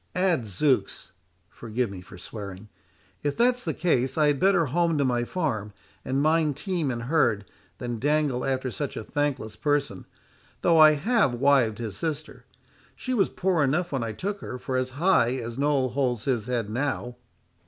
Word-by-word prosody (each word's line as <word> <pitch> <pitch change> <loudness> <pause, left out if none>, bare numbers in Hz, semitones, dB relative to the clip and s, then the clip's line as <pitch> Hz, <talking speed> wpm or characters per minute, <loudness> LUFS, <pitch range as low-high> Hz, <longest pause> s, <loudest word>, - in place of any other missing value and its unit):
Adzooks, 130 - 0 0.4
(forgive 115 +3 -3
me 95 -2 -8
for 90 +1 -13
swearing,) 100 +1 -8 0.5
if 145 -1 -2
that's 250 +1 +3
the - - -2
case 135 -6 +1
I 155 - +4
had 145 -2 0
better 190 -3 +4
home 165 +3 +1
to 140 - +2
my 120 -2 +1
farm, 120 - -2 0.3
and 135 +2 0
mind 155 -2 +2
team 175 -4 -1
and 120 -2 -3
herd, 120 -7 +1 0.3
than 120 -2 -4
dangle 145 -2 +1
after 130 -1 -1
such 145 +3 -4
a - - -4
thankless 140 -6 -2
person, 145 -7 -1 0.6
though 165 -2 +5
I 155 -1 +9
have 195 - +2
wived 130 -4 +3
his 110 -5 -5
sister. 145 -4 -4 0.5
She 255 - -4
was 205 -6 +2
poor 180 -5 +1
enough 160 +6 0
when 135 -4 -1
I 115 - -3
took 200 - -4
her, 130 - -6
for 130 +1 -4
as 130 0 0
high 145 -8 +3
as 120 0 -5
Noll 140 -2 +2
holds 125 -4 -1
his 120 -5 0
head 120 -4 -1
now." 125 +1 -3
135 Hz, 175 wpm, -26 LUFS, 120-155 Hz, 0.6 s, I